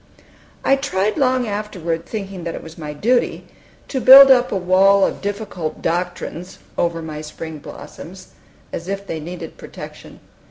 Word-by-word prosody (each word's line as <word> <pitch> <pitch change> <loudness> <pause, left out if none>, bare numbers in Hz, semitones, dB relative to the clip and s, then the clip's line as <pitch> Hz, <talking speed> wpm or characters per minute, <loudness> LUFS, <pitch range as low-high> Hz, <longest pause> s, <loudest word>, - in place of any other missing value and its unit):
I 275 - +4
tried 215 -7 -1
long 255 -4 +1
afterward, 185 -6 -3
thinking 195 -4 -6
that 170 -1 -4
it - - -8
was 160 0 -11
my 150 -3 -6
duty, 235 +12 0 0.4
to 265 - -2
build 270 +2 +10
up 250 -1 +4
a - - 0
wall 190 +2 +4
of - - -3
difficult 200 -5 -4
doctrines 175 +1 -3 0.2
over 170 -1 -1
my 155 -1 -6
spring 155 0 -8
blossoms, 185 +5 -11 0.4
as 170 - -5
if 200 0 -4
they 165 -4 -4
needed 170 +1 -8
protection. - - -11
185 Hz, 155 wpm, -20 LUFS, 165-215 Hz, 0.4 s, build